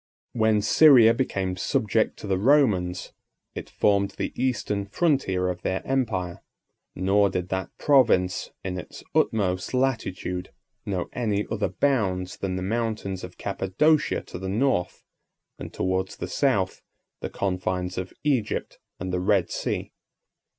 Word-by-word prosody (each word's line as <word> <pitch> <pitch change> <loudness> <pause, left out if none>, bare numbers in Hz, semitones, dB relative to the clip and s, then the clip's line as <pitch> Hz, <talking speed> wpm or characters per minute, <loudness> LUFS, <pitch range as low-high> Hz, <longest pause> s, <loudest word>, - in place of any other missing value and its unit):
When 110 -3 +2
Syria 125 -7 +7
became 95 -7 -1
subject 110 +4 0
to - - -9
the 95 -2 0
Romans, 100 -8 +2 0.4
it - - -7
formed 100 -1 +1
the - - -3
eastern 105 -5 -1
frontier 100 - +1
of 90 -1 -3
their 95 - -2
empire: 105 -10 -1 0.5
nor 100 +2 +3
did 90 -1 -3
that 95 0 -2
province, 115 -10 +3
in 90 -1 -3
its 90 - -10
utmost 95 0 +1
latitude, 105 -8 -1 0.4
know 95 -3 -2
any 105 -4 -1
other 110 -2 0
bounds 95 -10 0
than 95 -2 -3
the 95 - -3
mountains 105 -3 -2
of 90 0 -9
Cappadocia 100 - +1
to - - -9
the 95 0 -4
north, 100 -4 0 0.6
and - - -7
towards 95 0 -1
the - - -5
south, - - 0 0.4
the - - -4
confines 90 -1 -2
of 95 0 -5
Egypt, 135 -8 -1 0.2
and 90 0 -4
the 90 - +1
Red 95 -1 +2
Sea. - - -3
100 Hz, 135 wpm, -25 LUFS, 90-115 Hz, 0.6 s, Syria